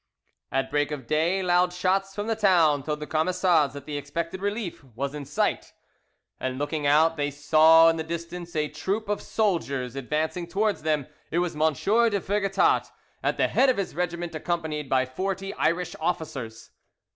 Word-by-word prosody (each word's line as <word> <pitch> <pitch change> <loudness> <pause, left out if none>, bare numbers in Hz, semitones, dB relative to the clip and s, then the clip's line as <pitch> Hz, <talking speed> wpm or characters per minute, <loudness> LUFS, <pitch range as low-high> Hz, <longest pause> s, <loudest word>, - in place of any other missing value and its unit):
At 135 0 -1
break 145 0 +1
of 145 -4 -6
day 165 +7 +1
loud 180 0 +3
shouts 195 +2 0
from 205 - -3
the 225 0 0
town 175 -9 +4
told 150 +2 -3
the - - -3
Camisards 160 -2 +2
that 140 -1 -8
the 150 -1 -4
expected 165 +6 -4
relief 205 -5 -3
was 135 +2 -5
in 145 -1 -6
sight, 145 +2 -1 0.7
and 130 0 -3
looking 145 +1 -2
out 160 +3 +4
they 145 -1 0
saw 155 +3 +6
in 165 0 +3
the 160 - -2
distance 170 +1 -6
a 150 -1 +1
troop 195 +8 -3
of 205 0 -1
soldiers 140 - -1
advancing 155 +6 -2
towards 205 +4 0
them; 150 -3 0 0.2
it 165 - -2
was 175 -1 0
M. 155 +1 +3
de 215 - +2
Vergetat 195 0 +1 0.3
at - - 0
the - - +3
head 270 - +4
of 255 - +2
his 195 - -3
regiment, 175 0 -3
accompanied 155 -3 -3
by 130 -1 +3
forty 195 +8 -3
Irish 175 +2 0
officers. 145 -9 -4
165 Hz, 175 wpm, -26 LUFS, 145-185 Hz, 0.7 s, saw